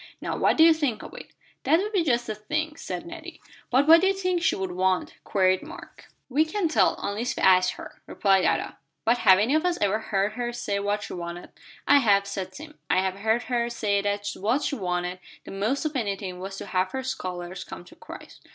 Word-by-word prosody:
Now - - -3
what - - +2
do 320 - +7
you 330 0 +8
think 290 -8 -2
of - - -10
it?" - - -10 0.4
"That 320 - +4
would 415 +3 -2
be 385 -5 +2
just 240 -5 +1
the 220 - -3
thing," 305 +9 -3
said 180 -9 -6
Nettie. 340 0 -9 0.3
"But 265 +3 +3
what 330 +1 +8
do 380 - +3
you 390 - +2
think 365 -2 -1
she - - +2
would 190 -1 -3
want?" 185 0 0
queried 185 -1 +2
Mark. - - -12 0.2
"We 280 +4 +2
can't 330 +1 -2
tell, - - +3
unless 215 +5 -2
we - - -3
ask 185 -1 +5
her," - - -11
replied 195 -2 +2
Ada. - - -1 0.3
"But 235 +2 +3
have 190 - +6
any 220 +8 +1
of 310 - +2
us 360 -1 0
ever 205 +1 +1
heard 200 -2 -1
her 240 +1 -3
say 205 -4 -2
what 205 +1 -1
she - - -7
wanted?" 175 0 -7 0.4
"I 285 - +7
have," 200 -5 +3
said 195 -2 -5
Tim. 305 +1 -11
"I - - +3
have 190 0 -2
heard 220 +3 +1
her 240 -1 -1
say 205 -4 0
that 205 0 -2
what 230 +9 0
she 285 - -1
wanted 180 -3 -3 0.3
the - - -9
most 215 +10 -1
of 305 -1 -2
anything 195 -6 -3
was 195 +1 -6
to - - -6
have 185 -1 -1
her 265 0 -3
scholars 185 -6 -5
come 175 - -10
to - - -16
Christ." - - -12
215 Hz, 230 wpm, -25 LUFS, 190-290 Hz, 0.4 s, you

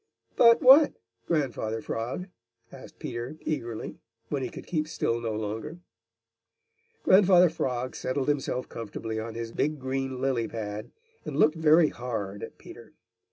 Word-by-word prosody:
"But 235 +4 +6
what, 275 +4 +8 0.3
Grandfather 125 -8 -1
Frog?" 115 +11 -4 0.5
asked 130 - -12
Peter 120 +5 -6
eagerly, 120 -7 -4 0.3
when 140 -2 -1
he - - -3
could - - -10
keep 155 -3 -1
still 120 -6 -1
no 115 -1 -2
longer. 110 +9 -4 1.3
Grandfather 185 -3 +6
Frog 130 -5 -2
settled 130 +1 -2
himself 135 -3 -1
comfortably 110 0 -5
on 110 0 -6
his 115 0 -5
big 150 +5 -1
green 130 -1 -3
lily 130 -3 0
pad 105 -2 -5 0.3
and - - -5
looked 155 - +5
very 160 0 +5
hard 105 -5 -5
at - - -8
Peter. - - -13
130 Hz, 140 wpm, -27 LUFS, 115-155 Hz, 1.3 s, what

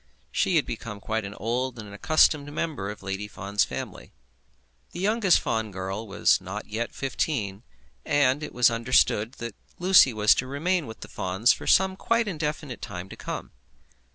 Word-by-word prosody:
She - - +1
had - - +3
become 105 -3 -6
quite 110 +1 -2
an 100 +1 -7
old 125 +4 -2
and 110 -2 -8
an 100 - -11
accustomed 145 +4 +3
member 145 -10 -3
of 105 -1 -8
Lady 95 +1 -4
Fawn's 100 0 -1
family. - - -6 0.8
The - - -6
youngest 205 -1 +3
Fawn 110 -1 -1
girl 95 +3 -5
was 100 - +2
not 100 +3 -6
yet 115 +2 -3
fifteen, 115 -7 -2 0.4
and 145 0 +2
it 150 - -5
was 120 -1 +4
understood 115 -1 +2
that 120 -4 -6 0.2
Lucy 180 -7 +6
was 105 -1 +5
to 130 - -9
remain 160 +4 -1
with 110 - -10
the - - -8
Fawns 95 +4 +2
for - - -9
some 190 0 +4
quite 230 +3 +1
indefinite 150 - -4
time 90 +2 -7
to - - -9
come. - - -6
115 Hz, 175 wpm, -26 LUFS, 105-150 Hz, 0.8 s, Lucy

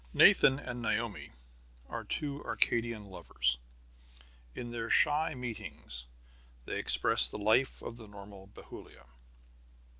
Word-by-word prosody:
Nathan 135 - +5
and 125 -4 -8
Naomi 110 -1 -3 0.6
are - - -7
two 145 -1 -5
Arcadian 115 -2 -1
lovers. 60 -10 -3 1.0
In 120 -1 -7
their 115 -1 -5
shy 150 0 +3
meetings 110 - -8 0.6
they - - -5
express - - +6
the - - -8
life 110 +6 0
of 115 - -8
the 110 -2 -12
normal 100 -1 -13
Bethulia. 100 - -14
115 Hz, 115 wpm, -30 LUFS, 100-125 Hz, 1.0 s, express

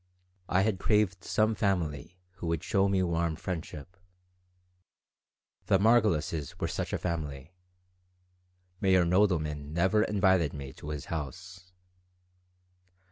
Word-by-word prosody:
I 95 +1 +3
had 100 -3 0
craved 100 -4 +1
some 110 +1 +1
family 90 -5 -2 0.2
who 85 - -5
would 85 0 -1
show 100 +1 +2
me 95 -1 +2
warm 85 -2 0
friendship. 85 -2 -6 1.7
The 100 - +4
Margolises 95 - +1
were - - -1
such - - -3
a - - 0
family 75 -3 -4 1.3
(Meyer 95 -3 +4
Nodelman 80 -6 +1
never 95 +6 +3
invited 95 -7 +2
me 70 -2 -7
to 75 - -9
his 75 -1 -5
house). 90 +4 -7
90 Hz, 115 wpm, -29 LUFS, 80-95 Hz, 1.7 s, The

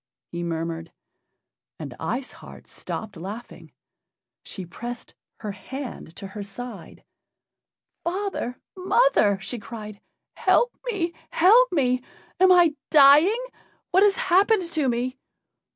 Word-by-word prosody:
he 175 - -4
murmured. 165 0 -4 0.9
And - - -7
Ice 255 +2 -3
Heart - - -13
stopped 220 -2 -6
laughing. 205 +8 -9 0.7
She 190 - -8
pressed 240 +7 -8 0.3
her 210 -2 -4
hand 240 - -8
to - - -8
her 200 +2 -7
side. 235 +5 -9 1.0
"Father! 360 -8 -3 0.2
mother!" 370 - +3
she 230 +6 -5
cried, 215 -2 -9 0.3
"help 485 - +2
me! 370 -8 -1 0.2
help 460 +9 +5
me! 255 -6 +1 0.4
Am 375 0 +6
I 350 -3 +6 0.2
dying? 310 - +6 0.5
What 375 - +4
has 405 -1 +5
happened 380 +3 +3
to 305 -5 +1
me?" 250 +2 -2
255 Hz, 115 wpm, -24 LUFS, -, 1.0 s, Am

